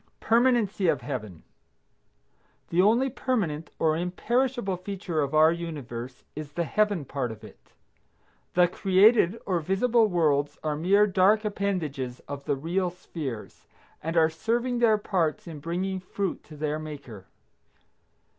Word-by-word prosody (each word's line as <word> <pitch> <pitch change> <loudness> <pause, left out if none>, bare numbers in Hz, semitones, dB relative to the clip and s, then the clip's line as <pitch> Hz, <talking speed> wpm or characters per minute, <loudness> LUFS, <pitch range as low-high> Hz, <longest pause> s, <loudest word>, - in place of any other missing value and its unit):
PERMANENCY 230 -5 +2
OF 150 -6 +2
HEAVEN. 110 - -6 1.3
The 170 +2 +3
only 230 +7 +4
permanent 200 - -2
or 155 -1 +2
imperishable 225 +5 0
feature 180 -3 -3
of 140 +1 -1
our 155 +1 +6
universe 135 -7 -6
is 150 -1 -7
the 170 - 0
Heaven 205 -1 +1
part 130 -3 -3
of 110 -1 -11
it. - - -15 0.8
The 180 0 +6
created 195 +3 +4
or 180 -3 +1
visible 220 +7 +2
worlds 150 -6 +1
are 155 -1 -1
mere 195 +7 +4
dark 205 +2 +3
appendages 160 -12 -2
of 140 -1 -8
the 145 - +1
real 175 +6 -1
spheres, 155 -9 -7 0.3
and 165 +2 -2
are 160 -1 +6
serving 235 +8 -1
their 225 -3 +4
parts 180 -6 -1
in 160 -3 -8
bringing 180 +5 -2
fruit 190 +1 -4
to 155 - -12
their 155 0 -2
Maker. 140 -10 -9
175 Hz, 135 wpm, -27 LUFS, 150-205 Hz, 1.3 s, our